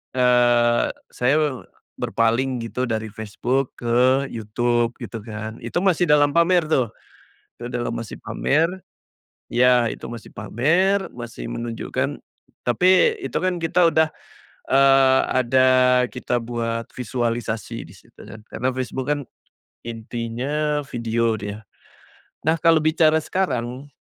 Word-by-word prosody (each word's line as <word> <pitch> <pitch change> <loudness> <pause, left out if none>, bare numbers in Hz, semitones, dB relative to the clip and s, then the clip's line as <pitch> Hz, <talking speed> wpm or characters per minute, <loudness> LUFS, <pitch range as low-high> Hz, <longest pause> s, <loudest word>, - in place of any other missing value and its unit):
eee, 120 -1 +4 0.3
saya 125 +4 +1
me 135 -4 -4 0.3
berpaling 120 +2 0
gitu 125 +2 -3
dari 110 -2 -3
Facebook 120 +5 -2
ke 125 +3 +2
YouTube, 120 +2 -1
gitu 115 - -6
kan. 110 +1 -6
Itu 125 +10 -3
masih 180 -2 +2
dalam 145 -1 +4
pamer 170 +2 +3
tuh, 130 -6 +3 0.7
itu 120 +1 -7
dalam 120 -1 -2
masih 115 -3 -7
pamer, 160 +4 +1 0.8
ya, 125 0 +4
itu - - -8
masih 120 -1 -9
pamer, 170 - +1
masih 120 - -8
menunjukkan 115 - -3 0.5
tapi 185 - +4
itu - - -5
kan 180 -2 0
kita 165 +1 +3
udah, 160 0 +3 0.6
eee, 135 -1 +5 0.2
ada 130 +2 +4 0.4
kita 125 -1 -2
buat 115 -1 -3
visualisasi 120 -3 -3
di - - -14
situ, - - -20
kan. 105 - -11
Karena 130 +2 -2
Facebook 130 0 -4
kan 145 - -1 0.7
intinya 120 +6 -3
video 115 -3 -1
dia. 105 +2 -6 0.8
Nah, 160 - +4
kalau 165 +1 +5
bicara 155 0 +3
sekarang 135 -6 -3
125 Hz, 120 wpm, -22 LUFS, 115-145 Hz, 0.8 s, eee